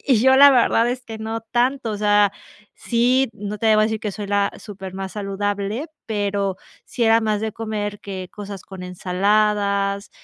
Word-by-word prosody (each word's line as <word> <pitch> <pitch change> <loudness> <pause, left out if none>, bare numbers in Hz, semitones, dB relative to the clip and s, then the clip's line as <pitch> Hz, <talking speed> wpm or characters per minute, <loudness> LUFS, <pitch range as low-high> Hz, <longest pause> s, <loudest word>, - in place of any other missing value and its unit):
Y 260 -4 +4
yo 265 +1 +5
la 280 +1 +9
verdad 240 -2 +3
es 250 0 -4
que 220 -1 -8
no 225 +1 -4
tanto. 240 +2 0
O - - -3
sea, 205 -1 +3 0.4
sí, 250 +2 +1
no 205 +1 -6
te 225 - -1
voy 215 - +4
a - - +2
decir 220 -1 -3
que 210 -3 -3
soy 205 0 -6
la 200 0 +1
súper 195 -3 -9
más 190 0 -5
saludable, 205 +5 -3 0.2
pero 200 -2 -1 0.3
sí 235 - -2
era 225 +1 +5
más 215 -1 0
de 220 -1 -3
comer 210 -2 -4
que 190 -2 -6
cosas 200 -2 -8
con 190 -2 -10
ensaladas, 200 +2 0
210 Hz, 190 wpm, -21 LUFS, 200-225 Hz, 0.4 s, la